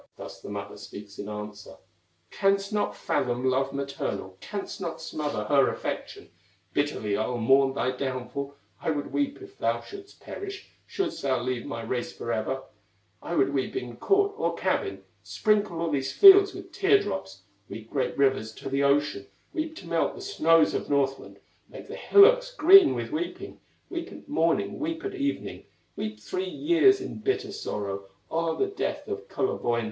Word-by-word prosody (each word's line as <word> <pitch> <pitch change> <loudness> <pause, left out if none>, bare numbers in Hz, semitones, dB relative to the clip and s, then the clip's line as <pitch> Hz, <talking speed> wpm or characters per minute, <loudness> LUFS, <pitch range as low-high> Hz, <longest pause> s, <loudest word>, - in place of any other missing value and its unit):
Thus - - -9
the - - -9
mother - - -6
speaks 100 0 -10
in 100 - -5
answer: 105 0 -7 0.6
"Canst 195 +1 +1
not 210 - 0
fathom 125 0 -1
love 135 +1 +1
maternal, 135 -9 -4
Canst 205 0 -6
not 170 -3 -4
smother 150 -8 -3
her 135 +5 +4
affection; - - -5 0.4
Bitterly 145 -8 0
I'll 125 - -1
mourn 135 +3 +4
thy 130 - 0
downfall, 135 +2 -4 0.3
I - - -1
would 145 -2 -2
weep 285 +5 -1
if 390 +1 -14
thou - - +1
shouldst 395 -1 -12
perish, 395 -1 -8 0.2
Shouldst 390 -4 -3
thou 130 -2 +1
leave 125 -1 -3
my 115 - -5
race 120 +2 -3
forever; 115 +3 -3 0.6
I 170 - -4
would 140 -2 +2
weep 135 -2 -1
in 120 -1 -4
court 405 0 +2
or 450 - 0
cabin, 400 -4 -1 0.2
Sprinkle 210 -5 +1
all 165 -1 -1
these 135 -2 -1
fields 395 0 +8
with - - -9
tear 400 +1 +4
drops, 95 - -5 0.3
Weep 110 +2 -9
great 135 - -1
rivers 130 -5 +2
to - - -7
the 135 +1 0
ocean, 140 -7 +1 0.3
Weep 315 0 -3
to - - -10
melt - - 0
the - - -9
snows 165 - +3
of - - -3
Northland, 135 -1 0 0.3
Make - - -10
the - - -7
hillocks - - +5
green 375 -2 +8
with - - -4
weeping, 330 +3 -4 0.3
Weep 345 0 -4
at - - -12
morning, - - +1
weep 325 +4 -3
at 400 - -3
evening, 285 -6 -3 0.3
Weep 105 0 -5
three 185 - -3
years 345 - +4
in 380 - -6
bitter 400 0 -1
sorrow 100 - -4 0.3
O'er 165 0 0
the - - +2
death - - -3
of 420 +2 -5
Kullerwoinen!" 120 - 0
150 Hz, 170 wpm, -27 LUFS, -, 0.6 s, fields